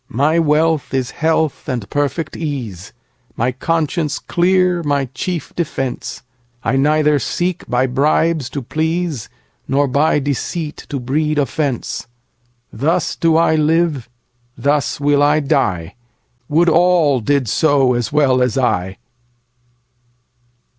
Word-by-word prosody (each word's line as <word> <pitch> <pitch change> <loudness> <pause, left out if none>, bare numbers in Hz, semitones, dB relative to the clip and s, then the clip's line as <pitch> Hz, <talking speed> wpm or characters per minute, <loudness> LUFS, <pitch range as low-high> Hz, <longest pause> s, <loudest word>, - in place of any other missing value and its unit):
My 150 +7 +2
wealth 155 -2 +1
is 130 -2 -1
health 160 -2 -1
and 120 -6 -3
perfect 145 +2 -2
ease, 120 - -5 0.4
My 120 +3 0
conscience 155 +2 -1
clear 180 0 +1
my 145 -3 0
chief 170 +6 -4
defence;I 125 -5 -4
neither 150 +1 +3
seek 175 +7 -2
by 125 +1 +2
bribes 145 +2 +1
to 140 0 -5
please, 160 -1 -2 0.4
Nor 140 +1 +2
by 145 +4 +2
deceit 150 +3 -3
to 140 - -3
breed 150 +5 -1
offence:Thus 120 +1 -3
do 165 -1 +2
I 165 -1 +3
live; 155 -4 +1 0.5
thus 145 0 0
will 145 0 +2
I 145 +1 +4
die; 95 - 0 0.6
Would 165 +4 +3
all 170 -5 +4
did 140 +2 0
so 140 -1 +3
as 120 -2 -2
well 140 -4 +3
as 125 -2 +1
I! 95 -7 0
145 Hz, 115 wpm, -18 LUFS, 125-160 Hz, 0.6 s, I